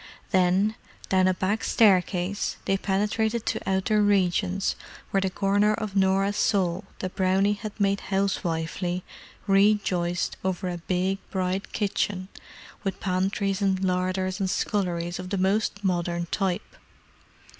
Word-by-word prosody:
Then, 190 +3 +3 0.4
down 185 -1 +4
a 185 - +3
back 200 +4 -1
staircase, 190 -2 +2
they 195 - +2
penetrated 210 +4 0
to - - -2
outer 190 +3 +2
regions 190 -1 +2 0.4
where 195 - +2
the 190 - 0
corner 205 +3 +2
of 210 -2 -5
Norah's 195 +1 +2
soul 185 -4 +1
that 185 -1 -5
Brownie 190 +2 +2
had 210 +1 -7
made 200 0 +2
housewifely 180 -2 -1 0.4
rejoiced 195 -3 +2
over 185 -1 -1
a 175 -1 -4
big, 185 +3 -1
bright 190 0 -2
kitchen 200 -2 -1 0.5
with 195 -2 -3
pantries 195 +1 0
and 190 -1 +1
larders 185 +1 0
and 190 -1 0
sculleries 175 -4 -1
of 180 0 -6
the 200 - -1
most 200 +2 0
modern 175 -2 0
type. 190 -3 -2
190 Hz, 130 wpm, -26 LUFS, 185-200 Hz, 0.5 s, down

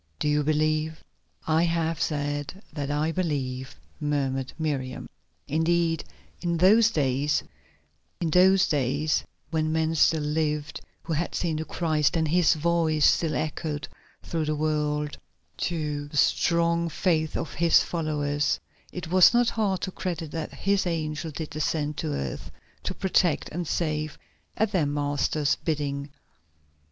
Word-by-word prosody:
Do - - -1
you 150 0 +3
believe?" 155 +1 0 0.4
"I 160 0 +3
have 165 -2 0
said 145 +4 -2
that 145 -3 -3
I 150 +2 0
believe," 135 -7 -2 0.2
murmured 135 -3 -1
Miriam. 135 -5 -3 0.4
Indeed, 165 +1 +1 0.4
in 170 -1 0
those 210 +6 +6
days 145 - +1 0.8
when 155 -3 +2
men 160 0 +1
still 160 -1 +3
lived 150 -1 -1 0.2
who 165 - -3
had 165 +3 -2
seen 165 -3 -1
the 160 - -3
Christ 155 -2 +1
and 160 -1 +1
His 175 0 +4
voice 160 -1 +2
still 160 -3 +3
echoed 155 0 -3 0.4
through 165 -2 -2
the 155 0 0
world, 150 -1 -1 0.5
to 150 -4 -3
the 145 - -7
strong 170 +2 +2
faith 160 -3 0
of 155 - -4
His 170 +1 +4
followers, 150 -3 -1 0.3
it 180 -3 -6
was 185 +5 +6
not 240 -1 +4
hard 200 -5 0
to 185 - -3
credit 170 -4 -4
that 160 -1 -4
His 195 -1 0
angel 160 -1 -2
did 155 +1 -6
descend 150 0 -1
to - - -2
earth 70 -3 -4 0.4
to - - -2
protect 185 -4 +1
and 170 +1 -4
save 155 -2 -1 0.4
at 220 -1 +1
their 175 -8 +2
Master's 145 0 0
bidding. 145 -2 -2
155 Hz, 135 wpm, -26 LUFS, 150-170 Hz, 0.8 s, those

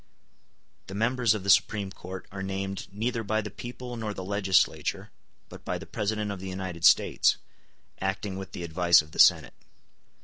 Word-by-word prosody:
The 95 - -7
members 115 0 +2
of 100 - -5
the 100 - -3
Supreme 100 -1 +2
Court 95 0 -9
are 95 0 -6
named 95 0 -4
neither 115 +3 -2
by 110 +1 0
the 105 -2 -5
people 125 +2 -8
nor 110 -2 -4
the 95 - -6
legislature, 95 -2 +1 0.4
but - - -12
by - - -2
the - - -9
President 105 0 -2
of 100 - -6
the 95 +1 -6
United 95 -3 -6
States, - - +4 0.6
acting 95 0 -2
with 95 0 -8
the 90 - -6
advice 85 0 +4
of 75 - -17
the - - -9
Senate. - - +5
100 Hz, 175 wpm, -27 LUFS, 95-110 Hz, 0.6 s, Senate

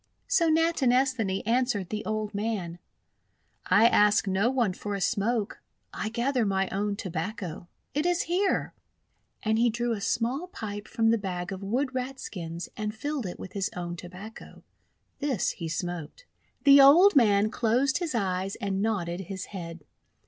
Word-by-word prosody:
So 335 -3 +3
Natinesthani 260 - +2
answered 230 -5 +1
the 215 0 -3
old 215 -1 -2
man: 200 -5 -3 0.5
— - - -45
"I 225 - +5
ask 210 -2 +4
no 195 +4 +2
one 240 -7 +1
for 205 +2 -4
a - - -3
smoke. 210 +2 -1 0.3
I - - -3
gather 245 +2 0
my 195 -2 +1
own 205 +1 -1
Tobacco. 180 -2 -5 0.3
It 300 +4 0
is 350 -1 +1
here." 370 +3 0 0.7
And 220 0 +1
he 240 +1 +4
drew 235 +1 -1
a 215 -3 -2
small 245 - -1
pipe 210 - -6
from 225 0 +2
the 230 - +2
bag 180 -2 -4
of 190 0 -6
WTood 255 +7 -1
Rat 260 +1 -4
skins 170 -2 -6
and 215 0 -4
filled 285 -1 -3
it 175 - -7
with 185 - -9
his 195 -2 -1
own 175 -1 -4
Tobacco. 185 +5 -11 0.6
This 275 -8 0
he 170 - -6
smoked. 175 - -5 0.4
The 280 0 +8
old 335 +8 +7
man 215 -4 +4
closed 250 +5 +1
his 335 -7 -3
eyes 190 -2 -1
and 195 -1 -2
nodded 185 -5 -1
his 190 0 -6
head. 170 -4 -7
215 Hz, 165 wpm, -27 LUFS, 190-255 Hz, 0.7 s, The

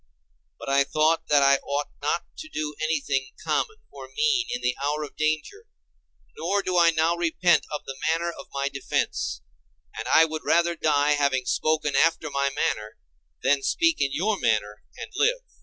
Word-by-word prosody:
But - - -10
I 140 0 +4
thought 155 +3 +1
that 145 -1 +4
I 140 0 +5
ought 145 +1 -3
not 150 +4 0 0.2
to 315 - -8
do 150 - -4
anything 145 -4 -1
common 435 - 0 0.2
or - - -10
mean 435 -4 +2
in 245 - -3
the 125 - +1
hour 150 +2 -1
of 145 - -9
danger: 155 - -2 0.7
nor 195 +5 -1
do 185 - -2
I 170 -1 +6
now 165 +1 +2
repent 175 +1 +2
of 150 - -5
the 135 0 -7
manner 170 +1 -1
of - - -11
my 140 0 -2
defence, 135 - -2 0.5
and - - -5
I 160 - +6
would 155 -1 -5
rather 170 0 +2
die 150 -2 +2
having 140 -3 +1
spoken 155 -1 0
after 160 +1 +2
my 140 0 +1
manner, 110 -5 -2 0.5
than 140 +1 +3
speak 330 - +1
in 140 - +2
your 205 +7 0
manner 105 -1 0 0.2
and - - -8
live. - - +2
155 Hz, 175 wpm, -25 LUFS, 140-170 Hz, 0.7 s, I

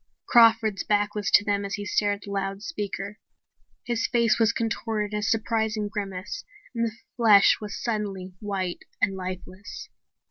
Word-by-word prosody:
Crawford's 225 -3 +5
back 205 0 +1
was 205 -2 -2
to 205 - +5
them 205 -1 0
as 200 0 -3
he 205 - -6
stared 205 0 +1
at 200 - -15
the 200 - -8
loudspeaker. 200 - -4 0.6
His 235 -2 -1
face 235 -1 +2
was 225 -1 +4
contorted 220 -2 -2
in 210 - 0
a - - -4
surprised 220 +1 0
grimace 200 - -5 0.3
and 230 -1 0
the 220 - -7 0.2
flesh 215 -4 +6
was 210 -1 -5
suddenly 200 -5 -3
white 195 -4 -3 0.2
and 195 - +1
lifeless. 185 - -7
210 Hz, 155 wpm, -26 LUFS, 200-225 Hz, 0.6 s, flesh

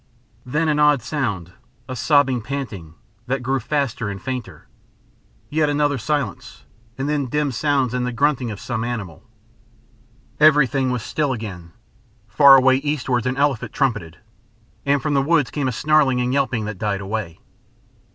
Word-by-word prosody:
Then 150 +5 0
an 150 -1 +1
odd 150 -5 +4
sound, 110 - -3 0.3
a 130 - -5
sobbing 135 -3 +2
panting, 110 - -6 0.3
that 130 0 -2
grew 135 +2 0
faster 125 -3 -2
and 100 -1 -6
fainter. 125 - -6 0.8
Yet 155 0 +2
another 145 -2 +1
silence, 120 - -3 0.3
and 135 +1 -2
then 145 -3 -1
dim 150 +2 -1
sounds 135 -1 0
and 125 0 -1
the 125 - -2
grunting 130 0 0
of 105 -2 -6
some 115 -3 -3
animal. 110 -9 -5 1.2
Everything 145 -3 +4
was 125 -3 -2
still 145 -3 -1
again. 95 -8 -7 0.5
Far 135 +5 +7
away 130 0 +5
eastwards 135 -4 -1
an 130 +1 -2
elephant 140 -4 0
trumpeted, 105 - -1 0.7
and 140 0 +2
from 150 -2 0
the 140 - +3
woods 145 -5 +2
came 145 -3 -2
a - - 0
snarling 140 -1 +2
and 125 +1 0
yelping 125 -5 0
that 105 -3 -6
died 105 -2 -1
away. 100 -4 -4
130 Hz, 155 wpm, -21 LUFS, 110-145 Hz, 1.2 s, Far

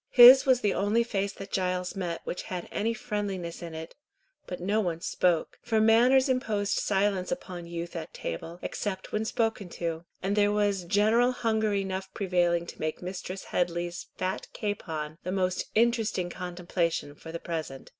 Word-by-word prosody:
His 255 +2 +10
was 255 -2 +5
the 205 - +2
only 210 +4 +2
face 200 -4 -1
that 195 0 -9
Giles 180 0 -1
met 175 -3 -3
which - - -4
had 180 -2 -4
any 225 +2 0
friendliness 205 -7 -4
in 165 -2 -7
it, 160 +1 -7 0.5
but 180 - -5
no 200 +5 +1
one 170 -4 -2
spoke, 170 -1 0
for 225 -2 +1
manners 240 +5 +5
imposed 220 -6 0
silence 195 -2 +1
upon 180 -10 -5
youth 170 0 -5
at 160 -2 -5
table, 165 - -5
except 190 -2 -4
when 215 +1 -1
spoken 220 -4 -1
to; 165 -1 -3 0.2
and 195 +2 +1
there 205 -1 +4
was 205 -3 +1
general 215 +6 +4
hunger 220 -4 0
enough 190 -1 -2
prevailing 175 -3 +1
to - - -10
make 155 +3 -3
Mistress 185 +1 -5
Headley's 175 0 -2
fat 185 0 -2
capon 160 -7 -4
the 180 - -3
most 185 -1 0
interesting 220 -6 +2
contemplation 175 -4 -2
for 160 +2 -10
the 170 - -3
present. 160 -6 -5
190 Hz, 165 wpm, -28 LUFS, 175-215 Hz, 0.5 s, His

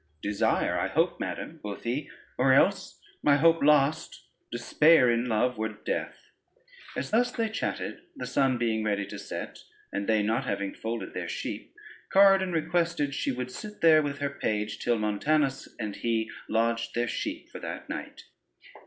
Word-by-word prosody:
"Desire, 100 0 +1
I - - 0
hope - - +1
madam," - - -5
quoth 105 -1 -6
he, 130 +5 -2 0.3
"or 130 +1 +4
else, 135 - +2 0.2
my 145 - +5
hope 165 +2 +4
lost, 150 +1 +2 0.3
despair 130 +2 +4
in 120 +1 +1
love 125 +1 0
were 110 0 0
death." 105 - -5 0.7
As - - -3
thus 245 +3 +3
they 225 -2 -1
chatted, 220 - -3
the 275 - -5
sun 135 -2 +2
being 115 -2 0
ready 100 -1 0
to - - -8
set, - - -6 0.3
and 100 0 -2
they 110 -2 +3
not 110 +2 0
having 100 -1 -2
folded 115 +1 -5
their - - -4
sheep, - - -5 0.4
Corydon 195 -1 +6
requested 165 -3 0
she 135 - -1
would 125 0 -4
sit 210 +8 -9
there 160 -2 +7
with 145 -1 -3
her 140 -1 -2
page, 105 -5 -2
till 120 -1 +1
Montanus 135 +7 0
and 105 -3 -4
he 115 -1 -1 0.2
lodged 115 +1 0
their 120 0 +1
sheep - - -4
for - - -8
that - - -6
night. - - -7
125 Hz, 165 wpm, -28 LUFS, 110-155 Hz, 0.7 s, there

